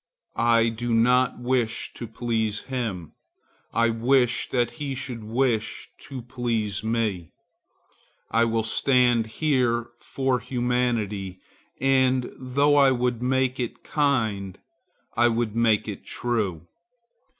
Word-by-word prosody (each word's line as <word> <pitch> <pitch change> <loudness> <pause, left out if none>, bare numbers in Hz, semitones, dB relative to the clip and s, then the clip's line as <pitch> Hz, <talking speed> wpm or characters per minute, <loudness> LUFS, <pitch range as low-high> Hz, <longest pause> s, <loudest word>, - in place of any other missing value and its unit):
I 115 0 +3
do 115 +1 -2
not 125 +2 +3
wish 125 -2 -1
to 120 - -7
please 110 -2 -2
him; 110 - -4 0.6
I 115 0 +2
wish 125 +1 +2
that 120 -2 +1
he 140 -2 -2
should 125 -4 -5
wish 115 0 -1 0.2
to 130 -3 -7
please 115 -5 -2
me. 110 -6 -2 1.0
I 115 +1 +3
will 115 -1 0
stand 120 0 +2
here 120 -3 0
for 130 -2 -1
humanity, 120 -6 -1 0.4
and 130 -1 +2
though 140 +3 +2
I 140 -1 +6
would 125 -2 0
make 130 0 +1
it 120 -2 -4
kind, 110 - 0 0.6
I 120 +1 +4
would 115 -2 -1
make 110 -2 +2
it 105 - -6
true. 105 -9 -2
120 Hz, 115 wpm, -25 LUFS, 110-130 Hz, 1.0 s, I